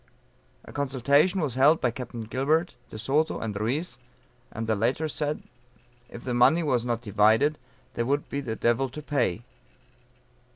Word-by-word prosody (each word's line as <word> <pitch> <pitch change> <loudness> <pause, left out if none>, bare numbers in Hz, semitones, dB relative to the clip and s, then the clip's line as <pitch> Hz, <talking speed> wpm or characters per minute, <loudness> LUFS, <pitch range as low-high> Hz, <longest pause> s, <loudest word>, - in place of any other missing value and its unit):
A - - -12
consultation 140 +6 +2
was 145 -6 -1
held 140 +6 +5
by 125 - +1
Capt. 120 -2 -7
Gilbert, 155 +4 +1
De - - -8
Soto, 140 +8 +1
and 105 -2 -4
Ruiz, 120 - -2 0.5
and 115 - -4
the 110 0 +1
latter 125 +9 0
said, 150 0 -3 0.7
if 120 - -10
the 125 - -2
money 155 +8 +4
was 125 -6 +1
not 120 -1 -2
divided, 110 +7 +3 0.3
"there 115 - -2
would 145 +2 0
be 140 - -3
the 115 -5 -4
devil 120 +4 +1
to 150 +5 -8
pay." 120 - 0
130 Hz, 160 wpm, -27 LUFS, 115-150 Hz, 0.7 s, held